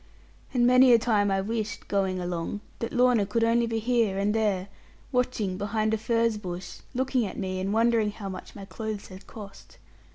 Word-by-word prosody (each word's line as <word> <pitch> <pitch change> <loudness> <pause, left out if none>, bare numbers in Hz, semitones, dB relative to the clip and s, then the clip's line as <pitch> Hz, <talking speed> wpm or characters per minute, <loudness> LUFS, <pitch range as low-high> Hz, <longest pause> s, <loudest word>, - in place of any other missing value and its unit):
And 245 -2 +2
many 255 +1 +7
a - - +8
time 215 -3 +2
I 195 0 +1
wished, 215 0 -4
going 190 -2 0
along, 175 +3 -3 0.2
that 230 - -3
Lorna 245 -3 +4
could 210 +3 0
only 230 +1 +3
be 225 0 -1
here 225 -3 +1
and 200 +1 +1
there, 205 -4 0 0.4
watching 245 -7 -1
behind 215 +2 0
a - - +2
furze 230 -1 +1
bush, 180 -2 -7 0.2
looking 260 -1 +1
at 185 - -8
me, 185 0 -3
and 190 +1 -2
wondering 225 -1 +3
how 205 -1 -7
much 185 -1 -8
my 200 -2 -8
clothes 215 0 -6
had 190 +1 -12
cost. 200 -3 -12
215 Hz, 190 wpm, -27 LUFS, 195-230 Hz, 0.4 s, a